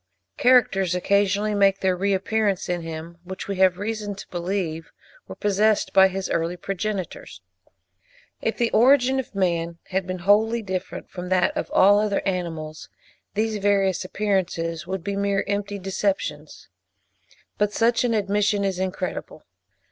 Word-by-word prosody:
Characters 195 Hz, -8 st, +3 dB
occasionally 200 Hz, +3 st, +1 dB
make 195 Hz, -1 st, +3 dB
their 185 Hz, -1 st, +2 dB
re 200 Hz, +3 st, 0 dB
appearance 200 Hz, 0 st, 0 dB
in 175 Hz, -1 st, -1 dB
him, 165 Hz, +1 st, -7 dB
which 185 Hz, +1 st, -7 dB
we 200 Hz, -1 st, -3 dB
have 185 Hz, -1 st, +4 dB
reason 210 Hz, 0 st, -4 dB
to 195 Hz, -, -10 dB
believe 175 Hz, -2 st, -3 dB, 0.4 s
were -, -, -8 dB
possessed 210 Hz, +1 st, +1 dB
by 190 Hz, 0 st, +7 dB
his 190 Hz, 0 st, -4 dB
early 170 Hz, +2 st, -1 dB
progenitors. 190 Hz, -, -5 dB, 1.0 s
If 225 Hz, -, -1 dB
the 235 Hz, -1 st, +1 dB
origin 260 Hz, +2 st, +4 dB
of 250 Hz, -5 st, -6 dB
man 170 Hz, -3 st, 0 dB
had 190 Hz, 0 st, -1 dB
been 185 Hz, 0 st, -3 dB
wholly 215 Hz, +5 st, +2 dB
different 185 Hz, -2 st, -5 dB
from 180 Hz, 0 st, -6 dB
that 185 Hz, -1 st, +2 dB
of -, -, -3 dB
all 200 Hz, +2 st, +5 dB
other 210 Hz, -1 st, 0 dB
animals, 165 Hz, -4 st, -4 dB, 0.5 s
these 215 Hz, 0 st, 0 dB
various 195 Hz, -2 st, +1 dB
appearances 175 Hz, -5 st, -2 dB
would 190 Hz, -2 st, -4 dB
be 200 Hz, +2 st, -3 dB
mere 200 Hz, 0 st, 0 dB
empty 200 Hz, 0 st, -2 dB
deceptions; 195 Hz, +1 st, -3 dB, 0.9 s
but 210 Hz, 0 st, +2 dB
such 230 Hz, +3 st, +2 dB
an 235 Hz, -2 st, +1 dB
admission 205 Hz, 0 st, +1 dB
is 190 Hz, -2 st, -1 dB
incredible. 190 Hz, -1 st, -4 dB
195 Hz, 150 wpm, -24 LUFS, 180-205 Hz, 1.0 s, by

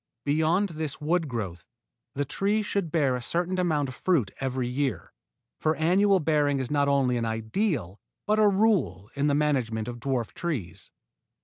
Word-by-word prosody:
Beyond 160 Hz, +7 st, +2 dB
this 155 Hz, -3 st, -5 dB
wood 165 Hz, +2 st, 0 dB
growth 95 Hz, -9 st, -5 dB, 0.5 s
the 145 Hz, +1 st, -1 dB
tree 205 Hz, +9 st, 0 dB
should 200 Hz, -6 st, -2 dB
bear 140 Hz, -6 st, +2 dB
a 125 Hz, -, -4 dB
certain 175 Hz, +7 st, -1 dB
amount 155 Hz, -6 st, +1 dB
of 130 Hz, -, -7 dB
fruit 140 Hz, -, +1 dB
every 130 Hz, -2 st, -2 dB
year, 125 Hz, -8 st, -2 dB, 0.5 s
for 155 Hz, 0 st, +1 dB
annual 190 Hz, +5 st, +3 dB
bearing 150 Hz, -3 st, +2 dB
is 130 Hz, 0 st, -3 dB
not 145 Hz, -1 st, +2 dB
only 135 Hz, -3 st, +2 dB
an 115 Hz, -, -1 dB
ideal 110 Hz, -, -2 dB, 0.3 s
but 215 Hz, +1 st, +2 dB
a 215 Hz, -, +6 dB
rule 195 Hz, -, +1 dB
in 140 Hz, +1 st, 0 dB
the 145 Hz, -, +2 dB
management 125 Hz, -7 st, 0 dB
of 120 Hz, -1 st, -6 dB
dwarf 125 Hz, -3 st, -2 dB
trees. 120 Hz, -, -4 dB
145 Hz, 170 wpm, -27 LUFS, 125-175 Hz, 0.5 s, a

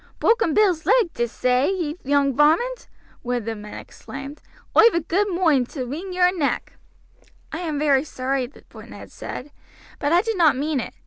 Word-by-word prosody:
"Broaken 455 Hz, -9 st, +2 dB
Bill's 370 Hz, -7 st, +2 dB
leg, 455 Hz, -9 st, +3 dB
did'st 240 Hz, -1 st, -3 dB
say, 255 Hz, +3 st, +2 dB
ye 335 Hz, -6 st, -2 dB
young 280 Hz, -1 st, +2 dB
varmint?" 340 Hz, -, +2 dB, 0.3 s
one 245 Hz, 0 st, -2 dB
of 235 Hz, -, -5 dB
the 225 Hz, -, -2 dB
men 210 Hz, 0 st, -9 dB
exclaimed. 275 Hz, +2 st, -9 dB, 0.3 s
"Oi've 460 Hz, -5 st, +6 dB
a -, -, +3 dB
good 375 Hz, +6 st, 0 dB
moinde 330 Hz, -9 st, +2 dB
to 260 Hz, -4 st, -4 dB
wring 325 Hz, +10 st, -6 dB
yer 360 Hz, 0 st, +3 dB
neck." 330 Hz, -6 st, -2 dB, 0.8 s
"I 320 Hz, -, -4 dB
am 320 Hz, -4 st, -3 dB
very 285 Hz, -2 st, +3 dB
sorry," 260 Hz, -3 st, -3 dB, 0.2 s
Ned -, -, -11 dB
said; 285 Hz, +3 st, -8 dB, 0.5 s
"but 290 Hz, -, 0 dB
I 350 Hz, +3 st, +4 dB
did 450 Hz, -3 st, -2 dB
not 310 Hz, -6 st, +4 dB
mean 295 Hz, 0 st, -1 dB
it. -, -, -6 dB
300 Hz, 180 wpm, -22 LUFS, 265-360 Hz, 0.8 s, Oi've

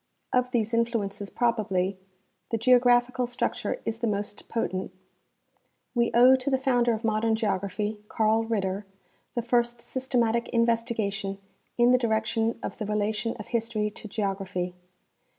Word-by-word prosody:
Of 250 Hz, -1 st, +2 dB
these 230 Hz, -2 st, 0 dB
influences, 215 Hz, -4 st, -1 dB
probably, 200 Hz, -6 st, 0 dB, 0.5 s
the 230 Hz, -, 0 dB
geographical 245 Hz, +1 st, +4 dB
structure 245 Hz, -, -2 dB
is 225 Hz, 0 st, -2 dB
the 235 Hz, -, 0 dB
most 205 Hz, 0 st, -3 dB
potent. 185 Hz, -5 st, -2 dB, 1.0 s
We 235 Hz, -1 st, +2 dB
owe 250 Hz, +2 st, +8 dB
to 260 Hz, +2 st, -2 dB
the 265 Hz, -, +3 dB
founder 245 Hz, -2 st, +2 dB
of 220 Hz, -, -8 dB
modea 220 Hz, 0 st, +1 dB
n 225 Hz, -1 st, +3 dB
geography, 210 Hz, 0 st, -2 dB
Carl 220 Hz, 0 st, +2 dB
Ritter, 200 Hz, -3 st, -2 dB, 0.5 s
the 240 Hz, -, -1 dB
first 240 Hz, 0 st, +1 dB
systematic 235 Hz, -2 st, 0 dB
investigation 225 Hz, -4 st, 0 dB, 0.4 s
in 240 Hz, 0 st, +5 dB
the 250 Hz, -, +5 dB
direction 225 Hz, 0 st, 0 dB
of -, -, -5 dB
the 215 Hz, -, -2 dB
relation 210 Hz, +2 st, -1 dB
of 215 Hz, -, -9 dB
history 225 Hz, -2 st, -1 dB
to 215 Hz, -, -10 dB
geography. 195 Hz, -3 st, -2 dB
225 Hz, 140 wpm, -27 LUFS, 210-240 Hz, 1.0 s, owe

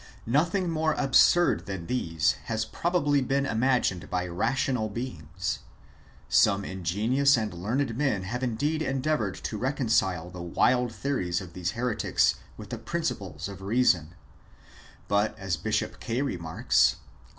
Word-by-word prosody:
Nothing 165 Hz, -, +1 dB
more 160 Hz, -1 st, +1 dB
absurd 170 Hz, +4 st, +4 dB
than 95 Hz, -4 st, -5 dB
these 80 Hz, -, +1 dB
has 110 Hz, -1 st, -1 dB
probably 145 Hz, +2 st, +1 dB
ever 130 Hz, -, -3 dB
been 140 Hz, 0 st, +1 dB
imagined 120 Hz, -7 st, +1 dB
by 90 Hz, 0 st, -1 dB
rational 110 Hz, +6 st, 0 dB
beings. 95 Hz, -, -4 dB, 0.7 s
Some 100 Hz, -1 st, +3 dB
ingenious 110 Hz, +10 st, +2 dB
and 110 Hz, -3 st, -2 dB
learned 115 Hz, +8 st, -1 dB
men 130 Hz, -8 st, 0 dB
have 120 Hz, +7 st, -4 dB
indeed 140 Hz, +6 st, -1 dB
endeavoured 135 Hz, -8 st, 0 dB
to 105 Hz, -, -3 dB
re 130 Hz, -, +1 dB
concile 95 Hz, -, 0 dB
the 90 Hz, -, -7 dB
wild 120 Hz, +8 st, +2 dB
theories 110 Hz, -10 st, -1 dB
of 90 Hz, -3 st, -10 dB
these 90 Hz, 0 st, -3 dB
heretics 120 Hz, -1 st, +1 dB, 0.2 s
with -, -, -10 dB
the -, -, -4 dB
principles -, -, -3 dB
of 100 Hz, -1 st, -9 dB
reason; 95 Hz, -6 st, +2 dB, 0.9 s
bnt, 105 Hz, +2 st, +1 dB
as 95 Hz, -4 st, -2 dB
Bishop 75 Hz, -, -2 dB
Kaye 120 Hz, +4 st, -1 dB
remarks 85 Hz, -11 st, +2 dB
(Eccl. -, -, -24 dB
110 Hz, 140 wpm, -27 LUFS, 95-135 Hz, 0.9 s, absurd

